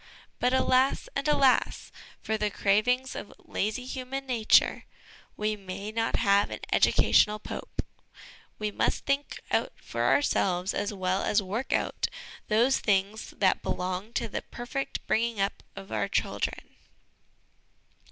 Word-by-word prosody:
But, 250 Hz, -, +2 dB
alas, 260 Hz, 0 st, +2 dB
and 275 Hz, +2 st, -1 dB
alas, 275 Hz, -3 st, +2 dB, 0.3 s
for 220 Hz, -, 0 dB
the 210 Hz, -1 st, 0 dB
cravings 240 Hz, +7 st, +1 dB
of -, -, -7 dB
lazy 220 Hz, +5 st, -3 dB
human 265 Hz, +1 st, -5 dB
nature 235 Hz, -4 st, +3 dB, 0.5 s
we 215 Hz, 0 st, 0 dB
may 200 Hz, +1 st, -6 dB
not 225 Hz, +1 st, -1 dB
have 200 Hz, -2 st, +3 dB
an -, -, -6 dB
educational 210 Hz, 0 st, +4 dB
pope; 215 Hz, -, -6 dB, 0.7 s
we 210 Hz, -1 st, -2 dB
must -, -, 0 dB
think 280 Hz, +1 st, -1 dB
out -, -, +1 dB
for -, -, -5 dB
ourselves, 185 Hz, -9 st, +2 dB
as 205 Hz, -, -1 dB
well 190 Hz, -1 st, -1 dB
as 210 Hz, -1 st, +2 dB
work 220 Hz, +8 st, -3 dB
out, -, -, 0 dB, 0.4 s
those 235 Hz, +5 st, +3 dB
things 200 Hz, +1 st, 0 dB
that 195 Hz, -, +3 dB
belong 185 Hz, +4 st, -3 dB
to 230 Hz, -, -1 dB
the 210 Hz, -, -4 dB
perfect 270 Hz, +3 st, -5 dB
bringing 230 Hz, -1 st, 0 dB
up 195 Hz, +1 st, -1 dB
of 195 Hz, -1 st, -10 dB
our -, -, 0 dB
children. -, -, -2 dB
215 Hz, 135 wpm, -28 LUFS, 200-255 Hz, 0.7 s, educational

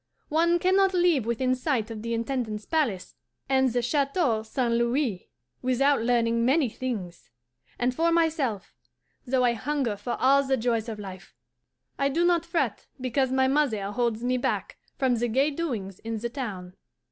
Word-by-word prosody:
One 335 Hz, +3 st, +3 dB
can 370 Hz, +2 st, +2 dB
not 390 Hz, -1 st, +3 dB
live 345 Hz, -10 st, +3 dB
within 255 Hz, +2 st, +1 dB
sight 255 Hz, -4 st, -1 dB
of 215 Hz, -1 st, -6 dB
the 230 Hz, +1 st, -2 dB
Intendant's 230 Hz, -3 st, -3 dB
palace 265 Hz, -, -1 dB, 0.3 s
and 265 Hz, -1 st, +3 dB
the 245 Hz, 0 st, 0 dB
Chateau 275 Hz, -2 st, +1 dB
St. 235 Hz, +2 st, -1 dB
Louis 235 Hz, -, 0 dB, 0.3 s
without 265 Hz, +1 st, +2 dB
learning 230 Hz, -1 st, +2 dB
many 265 Hz, +1 st, +3 dB
things; 210 Hz, -, -5 dB, 0.5 s
and, 245 Hz, +1 st, 0 dB
for 335 Hz, +5 st, +1 dB
myself, 310 Hz, -, 0 dB, 0.5 s
though 255 Hz, 0 st, +2 dB
I 240 Hz, -1 st, +3 dB
hunger 255 Hz, -1 st, -1 dB
for 240 Hz, +4 st, -4 dB
all 275 Hz, +2 st, +5 dB
the 265 Hz, -1 st, +1 dB
joys 230 Hz, -1 st, 0 dB
of 220 Hz, -, -5 dB
life, 190 Hz, -3 st, -10 dB, 0.6 s
I 275 Hz, 0 st, +2 dB
do 335 Hz, +5 st, +1 dB
not 340 Hz, -1 st, +2 dB
fret 335 Hz, 0 st, -1 dB
because 260 Hz, +1 st, 0 dB
my 265 Hz, 0 st, +3 dB
mother 255 Hz, -8 st, +1 dB
holds 235 Hz, 0 st, -1 dB
me 250 Hz, +1 st, +1 dB
back 245 Hz, -, -2 dB, 0.2 s
from 255 Hz, -3 st, +2 dB
the 240 Hz, +1 st, 0 dB
gay 270 Hz, +6 st, +2 dB
doings 235 Hz, -, -4 dB
in 225 Hz, 0 st, -4 dB
the 235 Hz, +2 st, -3 dB
town. 200 Hz, -9 st, -6 dB
250 Hz, 170 wpm, -26 LUFS, 230-280 Hz, 0.6 s, all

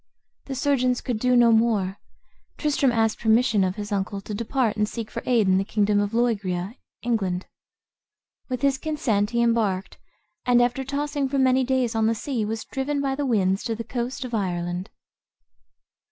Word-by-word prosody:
The 270 Hz, -, -5 dB
surgeons 255 Hz, -2 st, +1 dB
could 240 Hz, -4 st, -3 dB
do 250 Hz, +2 st, +2 dB
no 240 Hz, -1 st, +6 dB
more. 220 Hz, -4 st, +2 dB, 0.6 s
Tristram 285 Hz, -3 st, +2 dB
asked 225 Hz, -2 st, +1 dB
permission 220 Hz, -2 st, +3 dB
of 185 Hz, 0 st, -1 dB
his 205 Hz, 0 st, -6 dB
uncle 200 Hz, 0 st, -2 dB
to 210 Hz, -, -7 dB
depart, 230 Hz, +1 st, 0 dB
and 210 Hz, 0 st, 0 dB
seek 225 Hz, -2 st, -6 dB
for -, -, -4 dB
aid 230 Hz, -5 st, +3 dB
in 190 Hz, 0 st, +4 dB
the -, -, +1 dB
kingdom 205 Hz, 0 st, +1 dB
of 205 Hz, 0 st, 0 dB
Loegria 205 Hz, -5 st, 0 dB, 0.3 s
(England). 195 Hz, -6 st, -1 dB, 1.0 s
With 255 Hz, 0 st, -3 dB
his 275 Hz, -1 st, +2 dB
consent 230 Hz, -10 st, 0 dB
he 235 Hz, 0 st, +1 dB
embarked, 215 Hz, -5 st, 0 dB, 0.4 s
and 245 Hz, -1 st, +4 dB
after 245 Hz, +2 st, +1 dB
tossing 285 Hz, 0 st, -2 dB
for 275 Hz, -, -1 dB
many 260 Hz, 0 st, +3 dB
days 255 Hz, -2 st, 0 dB
on 220 Hz, -1 st, +2 dB
the 230 Hz, -, +1 dB
sea, 235 Hz, +1 st, -2 dB
was 220 Hz, +1 st, -3 dB
driven 280 Hz, +2 st, -2 dB
by 275 Hz, -1 st, 0 dB
the 280 Hz, +1 st, -2 dB
winds 195 Hz, -4 st, +1 dB
to 230 Hz, -2 st, -1 dB
the 230 Hz, -, -5 dB
coast 250 Hz, +3 st, -4 dB
of 245 Hz, -, -8 dB
Ireland. 180 Hz, -2 st, -2 dB
230 Hz, 180 wpm, -24 LUFS, 205-255 Hz, 1.0 s, no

